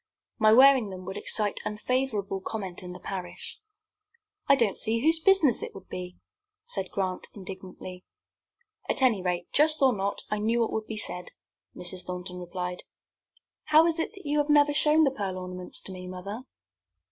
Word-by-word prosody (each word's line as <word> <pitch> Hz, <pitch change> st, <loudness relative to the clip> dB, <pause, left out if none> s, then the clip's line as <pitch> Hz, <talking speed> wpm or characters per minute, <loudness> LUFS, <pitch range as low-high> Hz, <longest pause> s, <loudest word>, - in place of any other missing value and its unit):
My 215 Hz, -1 st, +6 dB
wearing 260 Hz, -2 st, +7 dB
them 185 Hz, -1 st, -8 dB
would 190 Hz, +1 st, -6 dB
excite 205 Hz, 0 st, 0 dB
unfavorable 210 Hz, -3 st, -1 dB
comment 190 Hz, -3 st, -5 dB
in 180 Hz, -1 st, -8 dB
the 180 Hz, -, -9 dB
parish." 185 Hz, -, -6 dB, 0.9 s
"I 275 Hz, -, +7 dB
don't 230 Hz, -7 st, +2 dB
see 230 Hz, 0 st, 0 dB
whose 320 Hz, +4 st, +4 dB
business 325 Hz, -, +4 dB
it -, -, -6 dB
would 190 Hz, -1 st, -12 dB
be," 180 Hz, 0 st, -6 dB, 0.5 s
said 195 Hz, -, -1 dB
Grant, 185 Hz, -2 st, -2 dB
indignantly. 185 Hz, -1 st, -9 dB, 0.9 s
"At 265 Hz, -, +1 dB
any 230 Hz, -7 st, +4 dB
rate, 180 Hz, -1 st, -1 dB
just 305 Hz, +1 st, +4 dB
or 265 Hz, -2 st, +5 dB
not, 200 Hz, -1 st, -2 dB
I 210 Hz, -, 0 dB
knew 230 Hz, +3 st, +1 dB
what 230 Hz, -, 0 dB
would 220 Hz, -1 st, -3 dB
be 220 Hz, -, -5 dB
said," 180 Hz, -4 st, -1 dB, 0.5 s
Mrs. 180 Hz, +1 st, -5 dB
Thornton 180 Hz, 0 st, -6 dB
replied. 180 Hz, 0 st, -5 dB, 0.8 s
"How 310 Hz, +1 st, +6 dB
is 335 Hz, -1 st, +1 dB
it 325 Hz, -, 0 dB, 0.2 s
you 295 Hz, +1 st, +1 dB
have 295 Hz, +1 st, 0 dB
never 290 Hz, 0 st, +5 dB
shown 305 Hz, +1 st, +4 dB
the 275 Hz, -, +3 dB
pearl 195 Hz, -6 st, -3 dB
ornaments 180 Hz, 0 st, -5 dB
to -, -, -6 dB
me, 185 Hz, -1 st, -8 dB
mother?" 200 Hz, +7 st, -7 dB
205 Hz, 170 wpm, -28 LUFS, 185-265 Hz, 0.9 s, wearing